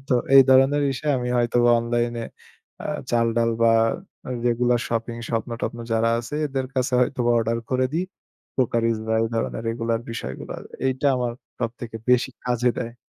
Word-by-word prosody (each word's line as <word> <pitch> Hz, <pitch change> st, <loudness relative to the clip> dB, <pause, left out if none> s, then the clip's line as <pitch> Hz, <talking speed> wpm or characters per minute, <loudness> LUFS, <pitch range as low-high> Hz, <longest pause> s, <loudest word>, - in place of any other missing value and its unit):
তো -, -, +2 dB, 0.2 s
এই 135 Hz, -, +11 dB
ধরনের 135 Hz, +2 st, +5 dB
বিষয় 145 Hz, +3 st, -1 dB
আমি 125 Hz, 0 st, -3 dB
হয়তোবা 120 Hz, 0 st, +3 dB
অনলাইনে 120 Hz, 0 st, -1 dB, 0.6 s
আ -, -, -2 dB, 0.2 s
চালডাল 115 Hz, 0 st, +2 dB
বা 115 Hz, -, +6 dB, 0.7 s
রেগুলার 120 Hz, 0 st, +2 dB
শপিং 115 Hz, 0 st, -2 dB
স্বপ্ন-টপ্ন 115 Hz, 0 st, -3 dB
যারা 115 Hz, +1 st, +2 dB
আছে 120 Hz, +4 st, -6 dB
এদের 135 Hz, -2 st, -3 dB
কাছে 130 Hz, 0 st, 0 dB
হয়তোবা 125 Hz, -1 st, +1 dB
অর্ডার 115 Hz, +1 st, 0 dB
করে 130 Hz, 0 st, +2 dB
দেই। 175 Hz, +3 st, 0 dB, 0.5 s
কোকারিস 115 Hz, -2 st, +1 dB
বা 110 Hz, -, +1 dB
এই -, -, +1 dB
ধরনের 115 Hz, 0 st, -2 dB
রেগুলার 115 Hz, 0 st, -1 dB
বিষয়গুলো। 65 Hz, -, -6 dB, 0.3 s
এইটা 130 Hz, +2 st, 0 dB
আমার 125 Hz, -1 st, -1 dB, 0.3 s
সবথেকে 115 Hz, 0 st, -4 dB
বেশি 125 Hz, -1 st, +3 dB
কাজে 125 Hz, 0 st, +2 dB
দেয়। 115 Hz, -1 st, -4 dB
120 Hz, 150 wpm, -23 LUFS, 115-125 Hz, 0.7 s, এই